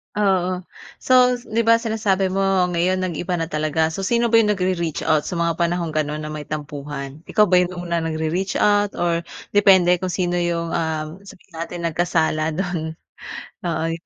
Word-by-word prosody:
Oo. 185 -3 +1 0.4
So, 255 - 0 0.3
‘di 230 0 -1
ba, 230 - +7
sinasabi 210 -4 0
mo 195 - -2 0.3
ngayon, 185 +2 +1
nag-iba 180 0 -2
na 165 -1 -2
talaga. 155 +1 0
So, 190 +3 -4
sino 235 +1 +1
ba 230 - +6
‘yong 210 -2 +3
nagre-reach 180 -4 -1
out 155 -2 +1
sa - - -4
mga 170 -1 0
panahong 170 -1 0
gano’n 155 0 -2
na 155 - -5
may 150 -1 -6
tampuhan? 145 -1 -6
Ikaw 215 - +4
ba 180 - +6
‘yong 180 0 0
una 175 -1 -2
nagre-reach 165 +4 -2
out 205 -1 +2
or 170 -1 -1 0.2
depende 195 -3 +5
kung 185 -1 -3
sino 175 -1 0
‘yong, 170 -1 -1
ah, 160 -2 -2 0.2
sabihin 180 -2 -16
natin 170 +1 -5
nagkasala 160 -2 0
do'n? 170 -3 -3 0.7
Oo 165 -2 -1
yung 165 +1 -6
175 Hz, 175 wpm, -21 LUFS, 160-185 Hz, 0.7 s, ba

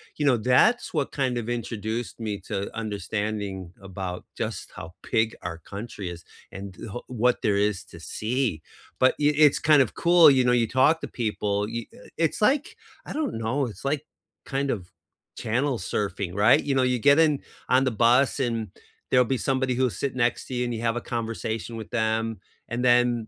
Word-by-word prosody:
you 150 - -1
know, 130 -4 +4
that's 130 - +3
what 150 -5 -1
kind 130 -3 -1
of 115 -1 -3
introduced 115 0 -4
me 105 -2 -3
to 100 +1 -5
understanding 105 -3 -3
about 95 -2 -6
just - - -4
how 85 +2 -9 0.2
big 110 0 +2
our 85 -1 -5
country 100 +1 -7
is, 85 -1 -9 0.3
and, 95 0 -8 0.2
oh, 120 - -6
what 125 0 0
there 100 -2 +2
is 105 -1 0
to - - -13
see. 115 - -2 0.4
But 130 - +5
y 150 0 +4
it's 150 -2 +5
kind 150 -3 +5
of 115 - -7
cool, 170 -3 +6
you 130 -1 +4
know, 125 - +3
you 115 -2 +3
talk 150 +7 +3
to 145 - -4
people 105 -4 -1
y 115 0 -4 0.3
it's 165 +4 0
like, 270 +7 +2 0.3
I - - -6
don't 310 - -2
know, 120 +4 -1
it's 115 - -10
like 145 +1 0 0.4
kind 140 0 -1
of 90 -5 -5 0.5
channel 125 +4 0
surfing, 95 -1 -3
right? 105 +4 +5
You 140 - +1
know, 130 - +3
you 125 -1 +2
get 140 +5 +5
in 155 -3 +3 0.3
on 130 +1 +4
the 130 - +1
bus, 120 +5 +3
and 115 -4 -1 0.4
there'll 125 0 +6
be 130 - 0
somebody 130 0 0
who'll 130 0 +2
sit 130 +7 -3
next 120 -1 0
to - - -7
you, 125 - 0
and 120 - -2
you 115 - -4
have 115 0 0
a - - -3
conversation 115 0 -3
with 110 - -8
them, 110 -2 0 0.3
and 120 +1 -3
then 120 -2 +3
120 Hz, 195 wpm, -25 LUFS, 105-130 Hz, 0.5 s, cool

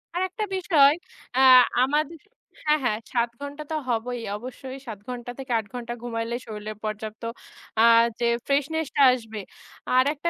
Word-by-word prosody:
আরেকটা 375 +4 -1
বিষয় 320 -7 +5 0.4
অ্যা 260 - +4 0.4
আমাদে 295 +4 +1 0.5
হ্যাঁ, 300 0 +3
হ্যাঁ 215 -3 +1
৭ 235 -1 +2
ঘণ্টা 285 +1 -6
তো - - 0
হবই 240 +1 -1 0.2
অবশ্যই 260 +3 -8
৭ 215 -3 -6
ঘণ্টা 245 -1 -5
থেকে 265 -1 -6
৮ 220 - -6
ঘণ্টা 240 -1 -5
ঘুমাইলেই 235 0 -3
শরীলে 215 -1 -6
পর্যাপ্ত 215 +1 -5 0.6
আ - - +7 0.4
যে 240 - +2 0.2
ফ্রেশনেশটা 290 +1 0
আসবে। 225 -4 -5 0.6
আরেকটা 290 +5 +2
250 Hz, 140 wpm, -25 LUFS, 230-290 Hz, 0.6 s, আ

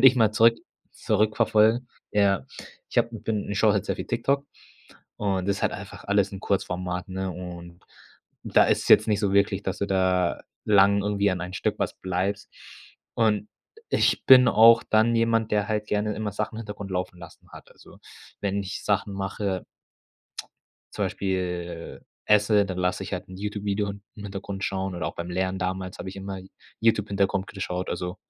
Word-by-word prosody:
Würde 135 - +8
ich 130 - +8
mal 110 -3 +4
zurück 115 +1 +5 0.4
zurückverfolgen, 110 +2 +2 0.2
ja. 100 -2 +2 0.4
Ich - - -10
habe - - +3
m 115 - -9
bin 105 -3 -2
ich 100 - -2
schaue 110 -2 +5
halt 100 0 0
sehr - - -1
viel - - -6
TikTok 140 +4 0 0.7
und 95 -2 -1
das 100 - +1
ist - - -8
halt - - +1
einfach - - -9
alles 100 -1 +1
in 95 - -7
Kurzformat, 90 -1 -2
ne, 95 0 -3
und 85 -1 -9 0.6
und - - -9
da - - +8
ist - - +2
es - - -5
jetzt 110 +2 +6
nicht 105 -1 +1
so 100 -2 0
wirklich, 100 0 +2
dass 95 0 -3
du 100 - -1
da 95 -2 +1 0.2
lang 100 -1 +5
irgendwie 100 -1 +1
an 90 -1 -2
ein 90 +1 -6
Stück - - -1
was - - -1
bleibst. 95 +3 -3 0.6
Und 105 -2 +1 0.4
ich - - +2
bin 130 -1 +8
auch 115 +1 +7
dann 110 +2 +3
jemand, 115 -1 +1
der 105 0 +1
halt 105 -1 -1
gerne 105 0 -1
immer 105 -1 -3
Sachen 105 +2 -3
im - - -6
Hintergrund 105 -2 -7
laufen 90 -1 -3
lassen 85 -2 -14
hat. - - -13
Also, - - -17 0.4
wenn 100 0 -1
ich 95 0 -6
Sachen 100 -1 0
mache 95 -1 -3 1.3
zum - - -1
Beispiel, 90 -3 -3 0.3
äh, 105 - +6
esse, 105 0 +4
dann 95 -2 -5
lasse 90 +1 0
ich 95 - -8
halt 90 - -4
'n 95 - -9
YouTube-Video 105 0 -2
in 100 0 -10
im 105 - -9
Hintergrund 100 0 -6
schauen 95 -1 -2
oder 85 -3 -3
auch 80 - -5
beim 85 +1 -5
Lernen 95 +1 -1
damals 95 0 -3
hab - - -7
ich 95 - -6
immer 95 0 -6
Y 95 0 -12 0.3
YouTube-Hintergrund 100 -3 +1
geschaut, 90 -2 -4
also 90 +1 -4
100 Hz, 195 wpm, -25 LUFS, 95-105 Hz, 1.3 s, Würde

